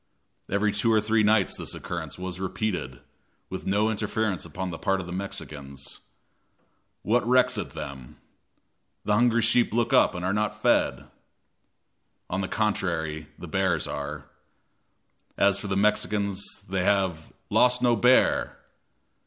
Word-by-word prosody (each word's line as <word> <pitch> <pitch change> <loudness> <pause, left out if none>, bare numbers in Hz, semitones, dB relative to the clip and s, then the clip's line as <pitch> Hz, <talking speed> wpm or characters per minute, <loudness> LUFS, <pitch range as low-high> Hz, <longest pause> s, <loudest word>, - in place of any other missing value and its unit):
Every 100 +2 +1
two 110 +3 +1
or 110 - +5
three 110 +1 +2
nights 105 -2 +3
this - - -4
occurrence 85 -3 -6
was 90 0 -5
repeated, 90 - -3 0.5
with - - -6
no 105 +3 +2
interference 105 -4 -1
upon 90 +3 -5
the 80 - -7
part 95 -2 +1
of 95 - -5
the 85 - -8
Mexicans. 70 -8 -6 1.0
"What 120 +3 +2
recks 125 0 +4
it - - -6
them?" 65 -4 -8 0.9
"The 105 - +2
hungry 115 +1 +3
sheep 120 +2 +3
look 120 +1 0
up - - +5
and 90 0 -4
are 95 - +1
not 105 0 -1
fed." - - +2 1.3
On 95 - -1
the 95 - -2
contrary, 85 -8 -1
the 90 - -9
bears 90 -2 0
are. 70 0 -5 1.1
As 100 0 +4
for 100 - -6
the 95 -1 -1
Mexicans, 100 -1 +1 0.2
they 95 -1 -1
have 95 -5 0 0.2
"lost 125 0 +4
no 120 -1 +4
bear!" 125 +4 +3
100 Hz, 145 wpm, -26 LUFS, 85-110 Hz, 1.3 s, or